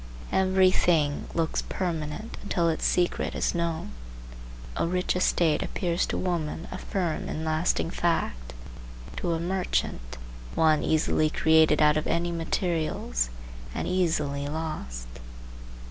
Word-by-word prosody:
Every 190 0 +4
thing 155 -6 +2
looks 165 -1 0
permanent 170 +3 -3
until 175 -4 +1
its 160 - -1
secret 175 -1 +1
is - - 0
known. 170 -1 -2 0.8
A - - 0
rich 180 +1 0
estate 170 -4 +2
appears 175 -1 -1
to - - -2
women 170 -2 -2
a 185 - -5
firm 175 -6 -2
and 160 - -3
lasting 160 +1 +1
fact; - - -1 0.6
to 170 - -1
a 165 - -1
merchant, 170 - -2 0.4
one 155 -1 +4
easily 155 0 +2
created 160 -1 +4
out 150 0 +5
of 155 - -1
any 170 +1 0
materials, 160 - -1 0.5
and - - -2
easily 150 -6 0
lost. 145 - -4
165 Hz, 125 wpm, -27 LUFS, 150-175 Hz, 0.8 s, out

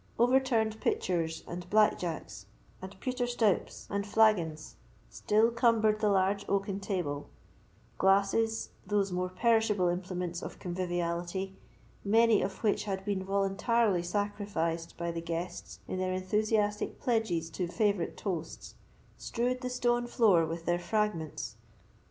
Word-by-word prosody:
Overturned 240 -3 +2
pitchers, 165 -3 -1
and 175 0 -7
black 215 +1 +4
jacks, 105 - -5 0.3
and 190 +1 -9
pewter 250 +1 -1
stoups, 225 -5 0
and 200 0 -2
flagons 200 -8 +2 0.3
still 220 +3 +2
cumbered 230 -2 +3
the 215 - +2
large 200 +1 +2
oaken 195 0 0
table; 175 -8 -3 0.7
glasses, 200 +4 +2 0.2
those 200 -2 +1
more 180 0 -1
perishable 215 -2 +2
implements 180 -1 -3
of - - -7
conviviality, 175 +1 -3 0.5
many 225 +1 +4
of 190 +3 -4
which 210 -1 +1
had 195 -2 -3
been 200 -2 -1
voluntarily 195 +1 +1
sacrificed 175 -3 -2
by 170 0 -2
the 165 0 -4
guests 170 +2 -5
in 185 - -3
their 185 0 0
enthusiastic 210 +2 0
pledges 200 -9 0
to 180 +2 -2
favourite 200 -1 0
toasts, 170 -5 -5 0.5
strewed 250 +1 -1
the 250 - -3
stone 240 -1 +1
floor 200 -9 +4
with 165 +1 -5
their 175 0 +1
fragments. 175 - -2
195 Hz, 130 wpm, -30 LUFS, 175-220 Hz, 0.7 s, black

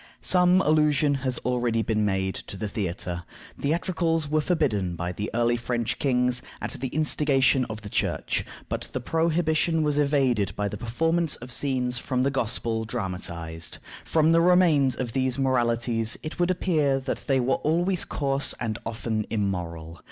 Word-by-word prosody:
Some 180 0 +4
allusion 150 -2 +3
has 130 -2 -1
already 120 -2 +1
been 110 -1 0
made 95 -2 0
to 100 - -8
the 105 - -3
theatre. 90 -4 -3 0.4
Theatricals 165 0 0
were 155 +1 +1
forbidden 110 - 0
by 85 +1 -3
the 105 +4 -4
early 120 0 +2
French 120 -1 -2
kings, 125 -2 +1 0.2
at - - -4
the 135 -1 -3
instigation 140 -2 +2
of 110 -1 -7
the 105 - -8
Church, - - -1 0.2
but - - -4
the - - -1
prohibition 160 +2 +1
was 150 -1 +1
evaded 135 -8 +2
by 105 - -1
the - - -5
performance 165 +7 0
of 125 +1 -10
scenes 125 -1 0
from 125 -1 -1
the 140 - +1
Gospel 115 -3 -1
dramatized. 85 -5 -4 0.3
From 160 0 +3
the 165 0 +5
remains 165 -7 +4
of 120 -2 -3
these 130 0 0
Moralities 120 -3 +1
it 155 +3 -6
would 175 0 +2
appear 155 -7 +1
that 130 0 -4
they 135 -2 +3
were 130 +1 +1
always 175 +4 +1
coarse 140 -1 -1
and 110 -3 -3
often 110 -1 -3
immoral. 85 -6 -3
130 Hz, 160 wpm, -26 LUFS, 110-155 Hz, 0.4 s, the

